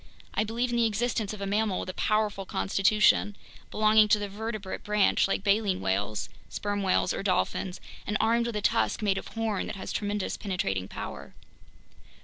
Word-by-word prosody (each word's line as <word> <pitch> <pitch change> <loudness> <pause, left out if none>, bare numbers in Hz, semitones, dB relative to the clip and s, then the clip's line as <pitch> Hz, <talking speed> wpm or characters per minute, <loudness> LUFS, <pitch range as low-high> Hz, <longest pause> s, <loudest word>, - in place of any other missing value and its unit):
I - - +2
believe 235 +3 -1
in 240 - 0
the 235 -1 +4
existence 220 -1 -1
of 210 -2 -7
a - - -2
mammal 205 -1 0
with - - -6
a - - -4
powerful 215 -1 0
constitution, 205 +2 +2 0.3
belonging 215 0 +5
to 210 - +4
the 205 -1 -3
vertebrate 210 -1 -5
branch 210 -2 +3
like 195 - -1
baleen 200 -1 +2
whales, 100 +2 -1 0.2
sperm 205 0 -2
whales, 185 -1 +2
or - - -3
dolphins, 185 -1 -1 0.3
and 210 - +1
armed 235 +1 +2
with 235 - -4
a 210 - -1
tusk 225 -1 +1
made 195 -2 +2
of - - -10
horn 225 -3 -2
that - - -5
has 190 - -6
tremendous 205 -1 -2
penetrating 95 - -2
power." - - -8
205 Hz, 180 wpm, -28 LUFS, 195-220 Hz, 0.3 s, belonging